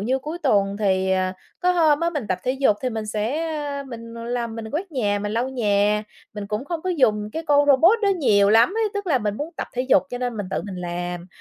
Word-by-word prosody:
như 250 +6 0
cuối 305 +6 -6
tuần 200 -6 +2
thì, 190 -2 +1
ờ, 185 0 0 0.3
có 360 - +3
hôm 315 -4 +3
á, 335 0 +1
mình 290 -10 -4
tập 185 - 0
thể 255 - 0
dục 265 -6 +2
thì 255 - 0
mình 220 -2 -4
sẽ, 215 +7 -2 0.2
a, 285 -1 -4
mình 230 -3 -9
làm, 235 0 -3
mình 220 -1 -6
quét 340 - -4
nhà, 205 -6 0
mình 205 +1 -3
lau 235 +3 0
nhà, 210 -4 +1 0.3
mình 205 -1 -5
cũng 210 +5 -3
không 330 +1 -4
có 370 - -1
dùng 215 -10 +2
cái 325 - -3
con 290 0 +4
robot 325 - +5
đó 405 - +3
nhiều 210 - +3
lắm 225 +2 +6
ấy. 445 -1 +1
Tức 405 -1 -3
là 295 -7 +2
mình 210 -2 -2
muốn 300 +6 -4
tập - - -3
thể 250 - -1
dục 255 -8 +4
cho 245 - -4
nên 245 -2 -3
mình 205 -2 -4
tự - - -2
mình 190 -3 -6
làm, 175 0 -4
235 Hz, 260 wpm, -23 LUFS, 205-290 Hz, 0.3 s, lắm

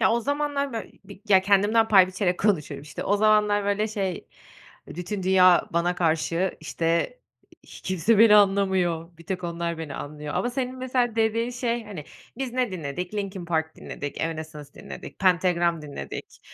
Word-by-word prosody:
Ya, - - +4
o 235 - +1
zamanlar 285 0 -1
böy 225 -3 -6
bir - - -13
ya, 190 -2 +6
kendimden 205 +3 +3
pay 190 -3 +7
biçerek 185 -1 -1
konuşuyorum. 150 -9 0
İşte, 145 -1 -7
o 205 - +2
zamanlar, 210 -1 +3
böyle, 205 +2 0
şey, 195 -5 -4 0.6
bütün 180 +4 -5
dünya 185 -1 +5
bana 170 +1 +1
karşı, 165 +2 0
işte, 165 - -1 0.5
hi - - -13
kimse 185 +4 +1
beni 215 -1 +8
anlamıyor, 190 -4 +2
bir 170 - -14
tek 185 -1 -4
onlar 170 -1 -3
beni 160 -3 -6
anlıyor. 150 0 -6
Ama 245 - 0
senin 255 0 -3
mesela 250 -3 0
dediğin 225 +1 +1
şey, 240 -2 -2
hani, 195 -8 -8 0.3
biz 265 -2 -4
ne 250 -5 0
dinledik? 175 +3 -5
Linkin 195 -3 -4
Park 160 -2 -2
dinledik, 145 0 -7
Evanescence 155 -3 -5
dinledik, - - -10
Pentagram 175 -3 +2
dinledik, 140 - -8
190 Hz, 165 wpm, -25 LUFS, 170-215 Hz, 0.6 s, beni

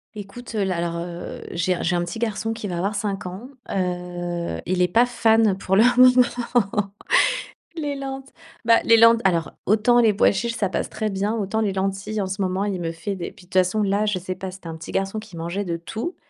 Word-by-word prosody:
Écoute, 215 +4 -9
heu, 210 - +1
là, 185 -2 -1
alors, 170 0 -2
heu, 170 0 -6
j'ai 180 +1 0
j'ai 175 +1 +1
un 175 - +1
petit 175 +5 -5
garçon 225 -1 -2
qui 225 -2 -5
va 175 -3 -3
avoir 200 +4 -1
5 200 -2 -3
ans. 190 +7 -7 0.2
Heu, 175 - -3
il 180 +1 0
est 180 - +4
pas 230 +7 +4
fan, 225 -4 +3
pour 190 -1 0
le 210 - +6
moment, 245 -5 +3 0.8
les 295 -3 -3
lent 270 -1 -5 0.4
bah, 230 0 +6
les 230 - +6
lent 230 +1 +7
alors, 170 -3 +1
autant 220 +4 +4
les 225 -2 +5
pois 200 - +4
chiches 235 +3 -2
ça 205 - 0
passe - - -2
très 215 - -2
bien, 200 +3 -1
autant 220 0 -1
les 210 -2 +1
lentilles, 195 +2 -2
en 200 - 0
ce 195 +2 -4
moment, 190 +1 0
il 195 -3 -2
me 165 -1 -2
fait 195 +5 -4
des 175 -2 -5
puis, 180 - -18
de - - -29
toutes 185 - +4
façons 185 +4 +1
là, 200 +1 +1
je 205 -2 +1
sais 185 +1 -4
pas. 190 +1 -6
C'était 185 -2 -11
un 165 - -5
petit 160 - -9
garçon 195 +2 -1
qui 215 -5 -11
mangeait 170 +5 -3
de 170 -2 -2
tout, 220 - -5
195 Hz, 230 wpm, -23 LUFS, 180-225 Hz, 0.8 s, lent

